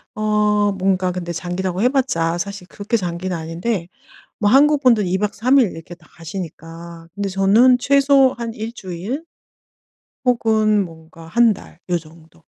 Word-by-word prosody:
어 210 Hz, -1 st, +1 dB
뭔가 190 Hz, -1 st, 0 dB
근데 175 Hz, -1 st, -5 dB
장기라고 180 Hz, +2 st, -3 dB
해 245 Hz, -, +4 dB
봤자 175 Hz, -12 st, 0 dB
사실 195 Hz, 0 st, -6 dB
그렇게 205 Hz, +5 st, -2 dB
장기는 180 Hz, -1 st, -3 dB
아닌데 170 Hz, +4 st, -3 dB, 0.5 s
뭐 205 Hz, -1 st, +2 dB
한국 290 Hz, +3 st, +4 dB
분들은 230 Hz, -7 st, +3 dB
2 185 Hz, +2 st, 0 dB
박 210 Hz, +1 st, -2 dB
3 255 Hz, +5 st, +3 dB
일 235 Hz, -8 st, +3 dB
이렇게 165 Hz, +2 st, -10 dB
다 170 Hz, -2 st, -23 dB
가시니까. 165 Hz, -1 st, -9 dB
근데 200 Hz, -1 st, -3 dB
저는 205 Hz, +7 st, +4 dB
최소 275 Hz, 0 st, +4 dB
한 230 Hz, -1 st, -4 dB
1 220 Hz, +1 st, -5 dB
주일 200 Hz, -, -6 dB, 1.0 s
혹은 220 Hz, -4 st, +2 dB
뭔가 165 Hz, -1 st, -14 dB
1 230 Hz, +5 st, +4 dB
달 185 Hz, -, -14 dB
요 175 Hz, -, +2 dB
정도. 165 Hz, +1 st, -16 dB
195 Hz, 265 characters per minute, -20 LUFS, 170-230 Hz, 1.0 s, 해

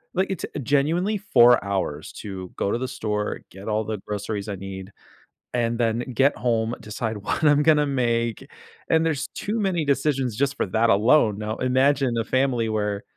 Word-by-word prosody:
like, 190 Hz, +1 st, +1 dB
it's 190 Hz, -, -3 dB, 0.2 s
genuinely 165 Hz, -, +1 dB
4 120 Hz, -, +5 dB
hours 95 Hz, -7 st, -3 dB
to 95 Hz, -3 st, -7 dB
go 100 Hz, -, 0 dB
to -, -, 0 dB
the 130 Hz, -, -2 dB
store, 105 Hz, -5 st, -3 dB
get 95 Hz, +3 st, -11 dB
all 110 Hz, 0 st, 0 dB
the 110 Hz, -1 st, -4 dB
groceries 105 Hz, 0 st, -4 dB
I 100 Hz, -, -3 dB
need, 95 Hz, 0 st, -8 dB, 0.6 s
and 120 Hz, -1 st, 0 dB
then 115 Hz, -1 st, +1 dB
get 135 Hz, +4 st, +3 dB
home, 115 Hz, 0 st, 0 dB
decide 110 Hz, +1 st, -4 dB
what 105 Hz, -, -3 dB
I'm 145 Hz, -1 st, +5 dB
gonna 150 Hz, -1 st, +4 dB
make, 120 Hz, -4 st, -1 dB, 0.4 s
and 160 Hz, 0 st, +3 dB
there's 155 Hz, -2 st, -1 dB
too 215 Hz, +3 st, -3 dB
many 185 Hz, -5 st, 0 dB
decisions 135 Hz, -4 st, 0 dB
just 140 Hz, +3 st, 0 dB
for -, -, 0 dB
that 110 Hz, +4 st, +2 dB
alone. 105 Hz, 0 st, +4 dB
Now 105 Hz, +1 st, -3 dB
imagine 130 Hz, 0 st, +2 dB
a -, -, -2 dB
family 130 Hz, -2 st, +1 dB
where 105 Hz, -1 st, -1 dB
120 Hz, 180 wpm, -24 LUFS, 105-140 Hz, 0.6 s, 4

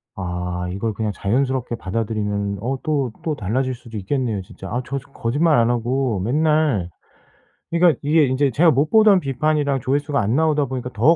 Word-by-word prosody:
아 90 Hz, -1 st, -4 dB
이걸 105 Hz, +4 st, -2 dB
그냥 110 Hz, +1 st, -2 dB
자연스럽게 125 Hz, +3 st, -1 dB
받아들이면 105 Hz, -1 st, -2 dB
어 130 Hz, +3 st, -2 dB
또 140 Hz, -5 st, 0 dB
또 160 Hz, -3 st, -1 dB
달라질 130 Hz, +4 st, -1 dB
수도 115 Hz, -2 st, -9 dB
있겠네요 110 Hz, 0 st, -2 dB
진짜. 95 Hz, +1 st, -11 dB
아 120 Hz, +6 st, -2 dB
저 140 Hz, +2 st, -3 dB
저 135 Hz, -, -20 dB
거짓말 145 Hz, +7 st, +1 dB
안 115 Hz, 0 st, +3 dB
하고 120 Hz, -1 st, 0 dB
맨날 145 Hz, -, +1 dB, 0.8 s
그러니까 170 Hz, -4 st, +4 dB
이게 150 Hz, +1 st, +4 dB
이제 135 Hz, +1 st, +1 dB
제가 165 Hz, +8 st, +4 dB
못 145 Hz, +2 st, +1 dB
보던 215 Hz, -3 st, +6 dB
비판이랑 145 Hz, -1 st, 0 dB
조회수가 145 Hz, +3 st, 0 dB
안 110 Hz, +4 st, 0 dB
나오다 155 Hz, -1 st, +2 dB
보니까 125 Hz, -1 st, -5 dB
더 145 Hz, +10 st, +4 dB
130 Hz, 370 characters per minute, -21 LUFS, 110-145 Hz, 0.8 s, 보던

